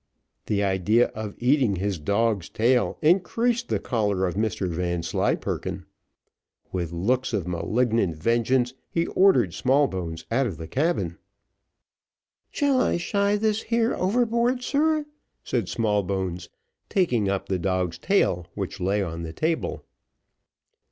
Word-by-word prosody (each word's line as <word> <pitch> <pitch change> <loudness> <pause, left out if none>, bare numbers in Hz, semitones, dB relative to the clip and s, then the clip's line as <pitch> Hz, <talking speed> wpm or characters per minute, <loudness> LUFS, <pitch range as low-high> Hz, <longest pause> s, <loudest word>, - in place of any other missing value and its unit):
The 100 -1 +1
idea 100 +5 +2
of 110 -2 -6
eating 125 -4 +2
his 95 -1 -2
dog's 100 +3 0
tail 120 +2 +1
increased 230 +8 +2
the - - +1
choler 105 -6 0
of 90 - -1
Mr 105 -2 -1
Vanslyperken. 85 -1 -2 0.9
With 85 -3 -3
looks 120 +10 0
of 95 -5 -1
malignant 110 +1 0
vengeance 120 +7 +1 0.2
he 165 0 0
ordered 150 - +3
Smallbones 95 - 0
out 130 +3 +2
of 95 - -5
the 80 - -7
cabin. 160 - -1 1.3
"Shall 280 -3 +2
I - - +1
shy 200 +3 +1
this 215 +1 +1
here 230 0 +1
overboard, 235 +5 +1
sir?" 305 +3 +1 0.4
said 115 -8 -1
Smallbones, 95 -5 -1 0.4
taking 125 - +1
up 100 -1 -2
the 95 -2 -1
dog's 90 -1 -1
tail, 90 - +1
which 100 -1 -4
lay 100 +3 +1
on 85 -2 -5
the 80 -1 -6
table. 160 - -2
110 Hz, 125 wpm, -25 LUFS, -, 1.3 s, ordered